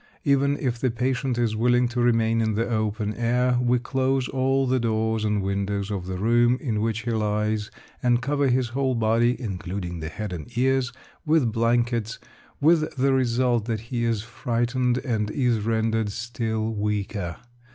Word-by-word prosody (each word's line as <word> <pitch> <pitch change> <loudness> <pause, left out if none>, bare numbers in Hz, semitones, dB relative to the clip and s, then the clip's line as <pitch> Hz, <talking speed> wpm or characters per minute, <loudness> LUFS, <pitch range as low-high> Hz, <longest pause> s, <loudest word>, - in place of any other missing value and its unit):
Even 140 0 +2
if 120 -3 -2
the 130 - +1
patient 125 +1 -1
is 115 -3 +1
willing 120 +2 +3
to 120 0 -1
remain 115 -1 +2
in 110 -1 0
the 115 +2 0
open 110 -2 -1
air, 125 +2 +1
we 125 0 +3
close 130 +1 0
all 135 +1 +1
the 130 0 +1
doors 110 -1 0
and 105 -2 0
windows 100 +1 -2
of 95 -3 -4
the 95 0 -3
room 120 +4 +3
in 110 -7 -2
which 115 0 -1
he 120 +1 -3
lies, 105 -1 0 0.3
and 120 -1 +3
cover 140 +2 0
his 125 -1 +1
whole 130 +1 0
body 115 +2 +2
(including 90 -5 -5
the 80 0 -4
head 105 +2 -5
and 115 +8 -8
ears) 130 0 +2 0.3
with 150 -7 +2
blankets, 115 0 0 0.4
with 155 +1 +3
the 135 +1 +2
result 125 -3 +1
that 115 -2 -2
he 120 -1 0
is 115 -3 0
frightened, 120 +2 -1
and 110 -4 -1
is 120 -1 +1
rendered 110 0 0
still 110 0 -3
weaker. 105 -3 -2
115 Hz, 170 wpm, -25 LUFS, 110-125 Hz, 0.4 s, willing